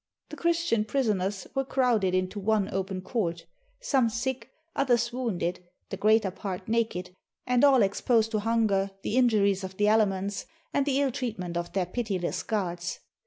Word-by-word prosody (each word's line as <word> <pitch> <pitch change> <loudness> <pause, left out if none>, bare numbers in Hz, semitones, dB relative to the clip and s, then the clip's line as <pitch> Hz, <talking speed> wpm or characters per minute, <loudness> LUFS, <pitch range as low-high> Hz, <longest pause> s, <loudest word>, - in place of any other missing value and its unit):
The 305 - -7
Christian 335 -8 +1
prisoners 205 -5 -1
were 270 - 0
crowded 240 -8 +1
into 185 +2 -1
one 210 0 +1
open 190 0 -2
court; 180 -5 -2 0.4
some 265 - +2
sick, 240 +1 -3 0.3
others 240 -3 +2
wounded, 200 -9 -2 0.3
the 195 - -4
greater 215 -1 +3
part 185 -1 -6
naked, 220 -6 -1 0.3
and 250 +1 +2
all 270 -5 +6
exposed 220 +3 +2
to 215 - +1
hunger, 210 -3 +1
the 215 - -2
injuries 205 -6 +3
of 190 0 -7
the 210 - +3
elements, 200 -2 +1 0.3
and 280 0 +1
the 275 -1 +2
ill 280 -2 +2
treatment 200 -9 -4
of 175 0 -3
their 190 -2 +1
pitiless 190 -3 -2
guards. 180 -4 -3
215 Hz, 160 wpm, -28 LUFS, 190-245 Hz, 0.4 s, all